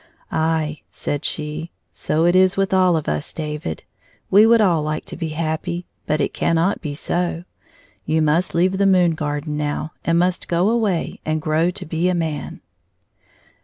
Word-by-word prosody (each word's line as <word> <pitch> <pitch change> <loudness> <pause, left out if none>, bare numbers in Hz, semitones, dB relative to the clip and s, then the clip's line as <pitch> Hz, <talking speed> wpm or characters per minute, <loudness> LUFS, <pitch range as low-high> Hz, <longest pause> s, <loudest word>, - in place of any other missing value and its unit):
"Aye," 160 -1 0
said 145 +1 -3
she, 155 +2 -2
" - - -50
so 160 +2 0
it 175 +1 +4
is 185 0 +4
with 195 0 +1
all 185 -3 +4
of 155 - -4
us, 75 -1 -2
David. 150 - -5 0.5
We 210 +3 +7
would 230 0 +6
all 180 -7 +3
like 155 +1 -3
to - - -7
be 165 -1 -3
happy, 160 +2 -3 0.2
but 155 - +1
it 140 - 0
cannot 170 +4 +1
be 150 -4 -4
so. 175 +2 -2 0.6
You 160 0 +1
must 160 +4 +1
leave 185 +3 +2
the 200 - +4
moon 180 -3 +4
garden 150 -1 -3
now, 150 +1 -2
and 170 0 +2
must 180 +1 +1
go 175 +5 +2
away 215 -7 0
and 155 0 -1
grow 155 +2 +1
to 180 - -6
be 165 +3 0
a 180 - +1
man." 160 -4 -3
165 Hz, 180 wpm, -21 LUFS, 155-180 Hz, 0.6 s, We